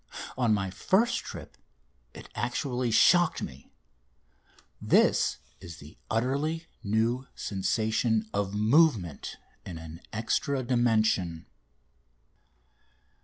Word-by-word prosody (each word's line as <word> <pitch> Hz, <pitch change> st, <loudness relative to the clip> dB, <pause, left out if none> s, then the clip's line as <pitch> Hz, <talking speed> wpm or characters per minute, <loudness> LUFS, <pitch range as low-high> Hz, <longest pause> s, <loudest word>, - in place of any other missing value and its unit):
On 120 Hz, -3 st, +1 dB
my 95 Hz, -3 st, 0 dB
first 230 Hz, -, +2 dB
trip -, -, -9 dB, 0.6 s
it -, -, -10 dB
actually 125 Hz, 0 st, -2 dB
shocked 175 Hz, -, +4 dB
me! 65 Hz, +1 st, -9 dB, 1.1 s
This -, -, +3 dB, 0.2 s
is 85 Hz, 0 st, -10 dB
the 75 Hz, -1 st, -13 dB
utterly 140 Hz, +8 st, -1 dB, 0.2 s
new 115 Hz, +5 st, 0 dB
sensation 110 Hz, +2 st, 0 dB
of 100 Hz, 0 st, -1 dB
movement 110 Hz, -, +2 dB, 0.3 s
in 90 Hz, -3 st, -7 dB
an 80 Hz, +1 st, -10 dB
extra 130 Hz, +5 st, -1 dB
dimension! 110 Hz, -9 st, +1 dB
110 Hz, 90 wpm, -28 LUFS, 95-130 Hz, 1.1 s, shocked